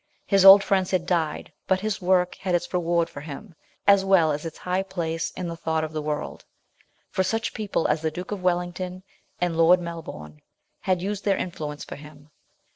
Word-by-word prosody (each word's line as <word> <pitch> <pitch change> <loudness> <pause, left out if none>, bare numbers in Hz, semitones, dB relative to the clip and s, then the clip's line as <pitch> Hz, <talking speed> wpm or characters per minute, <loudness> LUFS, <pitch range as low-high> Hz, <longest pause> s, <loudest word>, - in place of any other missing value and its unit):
His 195 -2 +3
old 195 +1 +10
friends 190 -2 +1
had 180 -3 0
died, 170 -4 -1
but 190 -1 +2
his 215 0 -2
work 180 0 +2
had 180 -2 -2
its 175 +1 -3
reward 170 -1 +1
for 145 - -10
him, 160 +6 -9 0.3
as 200 -1 +6
well 190 -5 +4
as 150 +3 -3
its 160 - -10 0.3
place 165 -3 -2
in 180 - -5
the 170 - -5
thought 160 -1 -1
of 155 0 -5
the 155 - -2
world, 150 0 -4 0.7
for - - 0
such 225 +4 -1
people 210 -6 -1
as 150 +1 0
the 160 - 0
Duke 180 +5 -7
of 205 -3 -4
Wellington 180 +1 -2 0.4
and 175 -2 0
Lord 165 +2 +5
Melbourne 160 - -8 0.4
had 185 -2 0
used 205 +1 -3
their 200 -2 +2
influence 150 -4 -5
for - - -8
him. 150 0 -15
175 Hz, 195 wpm, -25 LUFS, 160-190 Hz, 0.7 s, old